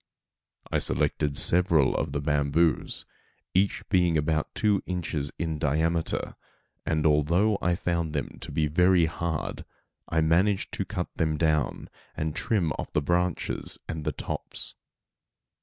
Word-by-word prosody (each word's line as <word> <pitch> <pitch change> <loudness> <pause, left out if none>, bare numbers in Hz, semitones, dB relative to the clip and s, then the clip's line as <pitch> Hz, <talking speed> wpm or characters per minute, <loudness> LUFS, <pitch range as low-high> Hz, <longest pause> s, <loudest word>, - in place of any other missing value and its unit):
I - - +2
selected 70 -2 0
several 85 -6 +4
of - - -1
the 70 - -2
bamboos, 75 +2 +1 0.5
each 95 +2 +1
being 90 -4 +3
about 80 0 -1
two 105 -2 +2
inches 80 -6 -2
in 80 -3 -2
diameter, 80 +3 0 0.5
and 80 -1 +1
although 85 +8 +3
I 90 -1 +2
found 85 -4 -1
them 70 - -4
to - - -7
be 80 -2 +1
very 90 +3 +4
hard, 80 -1 -3 0.5
I 80 -1 +2
managed 90 +5 +2
to 100 - -2
cut 90 -4 -3
them 80 -2 +1
down, 75 -2 0 0.3
and 80 -1 -2
to - - 0
trim 95 -8 +1
off - - -5
the 75 - +2
branches 90 +2 -1
and 80 -1 -4
the - - 0
tops. - - -4
80 Hz, 140 wpm, -27 LUFS, 75-90 Hz, 0.5 s, several